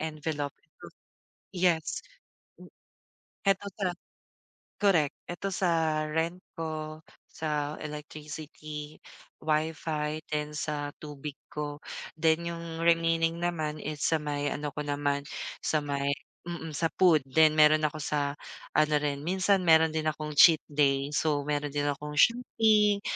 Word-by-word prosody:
envelope. 155 -2 -3 1.0
Yes, 175 -3 +1 0.6
m - - -13 0.8
ito 195 0 +3 0.2
sa 195 - 0 1.0
korek, 165 -8 +4 0.2
ito 175 +3 -3
sa 160 -4 +1
rent 165 +3 -1 0.2
ko, 155 -1 -4 0.3
sa 150 -1 -2
electricity, 150 0 -7 0.5
WiFi, 155 -1 -1 0.2
then 150 0 -1
sa 145 -1 -2
tubig 145 -1 -7 0.2
ko, 145 -1 -4 0.4
then 160 0 +3
yung 165 -1 -6
remaining 165 0 +3
naman 155 -3 -1
is 150 0 -5
sa 165 - +3
may 145 -1 -1
ano 145 0 -3
ko - - -3
naman, 145 0 0 0.4
sa 155 - +2
may 140 -1 -1 0.4
mm, 165 -2 -5
sa 165 - +1
food 170 -5 +6
then 155 +3 +5
meron 155 0 +6
ako 155 +1 -5
sa 140 -1 0 0.4
ano 155 0 +4
rin 140 -1 -1
minsan, 190 +2 +3
meron 160 -1 +6
din 155 0 0
akong 150 0 -5
cheat 160 -4 +8
day, 140 -1 +2
so 150 -2 +1
meron 145 0 0
din 145 0 0
akong 150 +1 -4
shopping. 215 -3 +4
155 Hz, 125 wpm, -29 LUFS, 150-165 Hz, 1.0 s, cheat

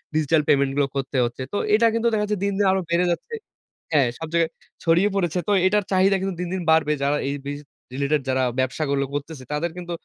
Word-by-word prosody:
Digital 155 0 +3
পেমেন্টগুলো 140 0 +2
করতে 135 0 -2
হচ্ছে। 120 +2 -5
তো - - 0 0.2
এটা 230 +2 +4
কিন্তু 230 +1 +1
দেখা 210 -1 +1
যাচ্ছে 210 0 -1
দিন, 200 0 0
দিন 205 - +2
আরো 190 - +1
বেড়ে 170 +1 +2
যাচ্ছে। 315 - -4 0.6
হ্যাঁ, 145 -5 +4
সব 160 - -5
জায়গায় 165 -1 +2 0.3
ছড়িয়ে 175 +5 +3
পড়েছে। 180 -2 0
তো - - +1 0.2
এটার 210 +2 +2
চাহিদা 190 +1 +4
কিন্তু 190 -2 -2
দিন, 180 - -2
দিন 190 - -2
বাড়বে। 160 -1 +3
যারা 145 +1 +2
এই 140 - -1
বিজ 145 0 -4 0.3
রিলেটেড 140 +2 0
যারা 130 0 +1 0.2
ব্যবসাগুলো 140 +2 0
করতেছে, 145 -1 -5
তাদের 165 +3 -1
কিন্তু 175 -1 -7
160 Hz, 210 wpm, -23 LUFS, 140-190 Hz, 0.6 s, এটা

